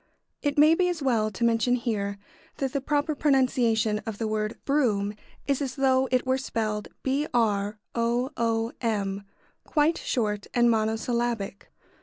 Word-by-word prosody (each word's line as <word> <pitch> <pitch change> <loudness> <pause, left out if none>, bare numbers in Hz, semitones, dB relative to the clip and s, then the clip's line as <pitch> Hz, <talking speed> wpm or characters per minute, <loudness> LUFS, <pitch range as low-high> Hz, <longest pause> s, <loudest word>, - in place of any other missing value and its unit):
] - - -56
It 290 -1 -1
may 305 +2 +7
be 360 +2 +2
as 335 -5 -3
well 225 -5 +2
to 215 +3 -5
mention 235 +1 +3
here 210 -5 -2 0.4
that 270 -2 -2
the 280 - 0
proper 295 +2 0
pronunciation 250 -7 +2
of 220 -1 -6
the 225 - -2
word 215 0 -2
"brougham" 215 -8 +1 0.3
is 280 0 0
as 265 -2 -3
though 265 -1 +3
it 255 0 +2
were 260 +1 +1
spelled 215 -5 -2 0.2
"broom," 230 -7 0 1.9
quite 305 +1 +2
short 210 -4 -1
and 240 -1 +5
monosyllabic. 225 -1 -1
240 Hz, 140 wpm, -26 LUFS, 215-275 Hz, 1.9 s, may